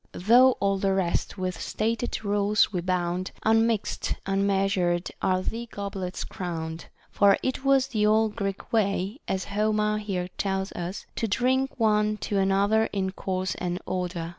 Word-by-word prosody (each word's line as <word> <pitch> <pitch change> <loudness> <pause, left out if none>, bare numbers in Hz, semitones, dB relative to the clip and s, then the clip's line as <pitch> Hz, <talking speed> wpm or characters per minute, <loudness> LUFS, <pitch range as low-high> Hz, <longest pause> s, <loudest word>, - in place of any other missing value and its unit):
25 180 - -9
Though 255 +2 +8
all 195 -3 0
the 195 0 +1
rest 185 +1 -1
with 185 -1 -3
stated 225 0 -2
rules 205 +1 +2
we 180 - -1
bound, 180 0 -1 0.2
Unmix'd, 225 -1 +1
unmeasured, 195 -3 +1
are 185 0 +1
thy 235 +4 -4
goblets 195 -3 -5
crown'd: 165 -2 -5
* - - -32
for 200 -1 +5
it 260 0 -2
was 270 -1 +3
the 210 -4 +1
old 215 0 +3
Greek 195 -2 -4
way, 200 +1 0
as 190 -1 -1
Homer 210 +1 +1
here 185 -4 -3
tells 190 0 -1
us, 175 +3 -5
to 225 - 0
drink 255 +5 0
one 210 -1 +2
to 205 -1 -1
another 200 +3 +3
in 190 -3 -2
course 185 -1 -2
and 180 0 -3
order. 175 -2 -3
200 Hz, 160 wpm, -26 LUFS, 185-215 Hz, 0.2 s, Though